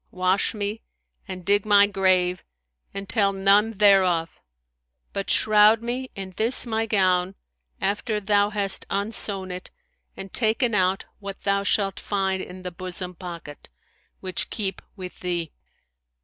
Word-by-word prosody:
Wash 185 Hz, +4 st, 0 dB
me 210 Hz, +1 st, -3 dB, 0.5 s
and 185 Hz, -2 st, -7 dB
dig 205 Hz, 0 st, +3 dB
my 205 Hz, -1 st, +6 dB
grave 185 Hz, -2 st, +1 dB, 0.5 s
and 195 Hz, 0 st, -6 dB
tell 200 Hz, 0 st, +2 dB
none 200 Hz, +3 st, +3 dB
thereof: 190 Hz, -5 st, +3 dB, 0.7 s
but 195 Hz, -, -3 dB
shroud 215 Hz, +1 st, +5 dB
me 250 Hz, +2 st, -3 dB
in 190 Hz, -2 st, -7 dB
this 230 Hz, +4 st, +2 dB
my 225 Hz, -1 st, -1 dB
gown, 185 Hz, -2 st, +2 dB, 0.4 s
after 210 Hz, +2 st, -1 dB
thou 205 Hz, 0 st, +2 dB
hast 200 Hz, -2 st, -1 dB
unsewn 200 Hz, -2 st, -1 dB
it 180 Hz, 0 st, -7 dB, 0.5 s
and 195 Hz, -1 st, -8 dB
taken 230 Hz, +1 st, +2 dB
out 190 Hz, -1 st, +1 dB
what 200 Hz, -1 st, -7 dB
thou 200 Hz, 0 st, +1 dB
shalt 200 Hz, -1 st, 0 dB
find 190 Hz, -2 st, -1 dB
in 185 Hz, 0 st, -9 dB
the 180 Hz, -, -5 dB
bosom 180 Hz, +1 st, -5 dB
pocket, 170 Hz, -5 st, -9 dB, 0.5 s
which 185 Hz, -2 st, -3 dB
keep 195 Hz, -4 st, -3 dB
with 185 Hz, -3 st, -9 dB
thee. 175 Hz, -3 st, -3 dB
195 Hz, 135 wpm, -24 LUFS, 185-210 Hz, 0.7 s, my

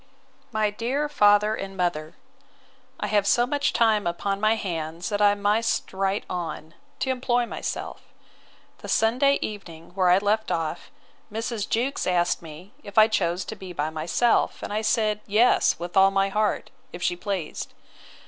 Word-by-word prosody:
MY 215 Hz, -2 st, +1 dB
DEAR 255 Hz, +8 st, -1 dB
FATHER 210 Hz, -6 st, +4 dB
AND 195 Hz, -2 st, -6 dB
MOTHER, 175 Hz, -3 st, -2 dB, 0.8 s
I -, -, -2 dB
have 205 Hz, -1 st, +1 dB
so 240 Hz, +4 st, +4 dB
much 285 Hz, +2 st, 0 dB
time 220 Hz, -5 st, +2 dB
upon 195 Hz, +3 st, -2 dB
my 215 Hz, +1 st, +3 dB
hands 170 Hz, -4 st, -4 dB
that 205 Hz, -1 st, -1 dB
I 205 Hz, 0 st, +5 dB
must 210 Hz, +3 st, 0 dB
write 195 Hz, +1 st, -1 dB
on, 165 Hz, -2 st, -5 dB, 0.3 s
to 265 Hz, -, +1 dB
employ 245 Hz, -1 st, 0 dB
myself. -, -, -5 dB, 0.8 s
The -, -, -9 dB
Sunday 255 Hz, +5 st, +3 dB
evening, 170 Hz, -6 st, -8 dB
where 185 Hz, -1 st, +2 dB
I 180 Hz, -, +6 dB
left 210 Hz, +2 st, 0 dB
off, 165 Hz, +1 st, -3 dB, 0.4 s
Mrs. 225 Hz, -1 st, -3 dB
Jewkes 255 Hz, +5 st, -1 dB
asked 175 Hz, -1 st, +1 dB
me, 165 Hz, +4 st, -12 dB
If 205 Hz, -6 st, -12 dB
I 215 Hz, 0 st, +8 dB
chose 185 Hz, -4 st, -1 dB
to 220 Hz, -, -6 dB
be 190 Hz, -3 st, -9 dB
by 155 Hz, -1 st, -2 dB
myself; 165 Hz, +9 st, +1 dB
I 210 Hz, +1 st, -2 dB
said, 215 Hz, -1 st, +1 dB
Yes, 220 Hz, +4 st, +3 dB
with 175 Hz, +2 st, -7 dB
all 195 Hz, 0 st, +6 dB
my 195 Hz, 0 st, +1 dB
heart, 210 Hz, +1 st, -1 dB, 0.2 s
if 175 Hz, -, -7 dB
she 175 Hz, -, +1 dB
pleased. 180 Hz, -3 st, -4 dB
205 Hz, 160 wpm, -25 LUFS, 175-220 Hz, 0.8 s, I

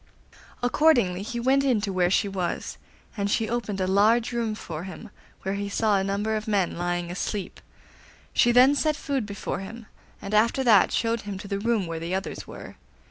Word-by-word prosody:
Accordingly 245 Hz, -, +3 dB
he 235 Hz, +4 st, -4 dB
went 265 Hz, +3 st, +3 dB
in 255 Hz, -5 st, +2 dB
to 200 Hz, -2 st, -2 dB
where 180 Hz, -1 st, +2 dB
she 200 Hz, -, +2 dB
was, 190 Hz, -3 st, -3 dB, 0.4 s
and 200 Hz, -2 st, -1 dB
she 220 Hz, +2 st, +1 dB
opened 220 Hz, -4 st, -3 dB
a 185 Hz, -, +1 dB
large 215 Hz, +6 st, +3 dB
room 230 Hz, -3 st, -1 dB
for 165 Hz, -4 st, -7 dB
him, 190 Hz, +4 st, -9 dB, 0.3 s
where 195 Hz, -, -1 dB
he 200 Hz, 0 st, -3 dB
saw 210 Hz, -1 st, +2 dB
a -, -, -1 dB
number 205 Hz, +3 st, -1 dB
of 215 Hz, 0 st, -4 dB
men 200 Hz, -5 st, +1 dB
lying 175 Hz, 0 st, -2 dB
asleep. 195 Hz, +2 st, -4 dB, 0.7 s
She 240 Hz, -, +4 dB
then 255 Hz, +3 st, +6 dB
set 305 Hz, +1 st, +1 dB
food 275 Hz, -7 st, -2 dB
before 200 Hz, -2 st, -4 dB
him, 225 Hz, +4 st, -8 dB, 0.3 s
and 200 Hz, +1 st, -7 dB
after 230 Hz, +5 st, +3 dB
that 220 Hz, -6 st, +5 dB
showed 230 Hz, 0 st, 0 dB
him 205 Hz, -1 st, -6 dB
to 195 Hz, -, -8 dB
the 200 Hz, 0 st, -2 dB
room 225 Hz, -2 st, +1 dB
where 165 Hz, -1 st, -4 dB
the 170 Hz, +3 st, -3 dB
others 190 Hz, -, -5 dB
were. -, -, -10 dB
205 Hz, 195 wpm, -26 LUFS, 190-235 Hz, 0.7 s, then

